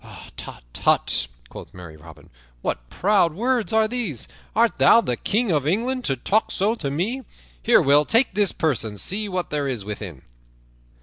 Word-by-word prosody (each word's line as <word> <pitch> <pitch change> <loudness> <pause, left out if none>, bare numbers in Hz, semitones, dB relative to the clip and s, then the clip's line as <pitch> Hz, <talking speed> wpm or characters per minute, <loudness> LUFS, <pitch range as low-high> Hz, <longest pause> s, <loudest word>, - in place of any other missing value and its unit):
"Hut, - - -10
tut," - - +1 0.2
quoth - - -11
merry 85 -3 -10
Robin, 80 -1 -15 0.3
"what - - -3
proud 185 - +2
words 240 +2 0
are 220 0 +3
these? 215 - -2 0.3
Art 230 +1 +2
thou - - +7
the 125 - -1
King 215 - 0
of 145 -3 0
England, 245 +8 -1
to 135 - +1
talk 205 - +1
so 205 +4 +1
to 160 -12 -4
me? 195 - -2 0.4
Here, - - +4
Will, 145 +2 +5
take 230 - +3
this 205 -1 +2
purse 155 -8 0
and 105 -2 -6
see 205 - -2
what 185 -2 -3
there 145 -1 -1
is 120 -7 -4
within." 100 -9 -7
175 Hz, 175 wpm, -23 LUFS, -, 0.4 s, thou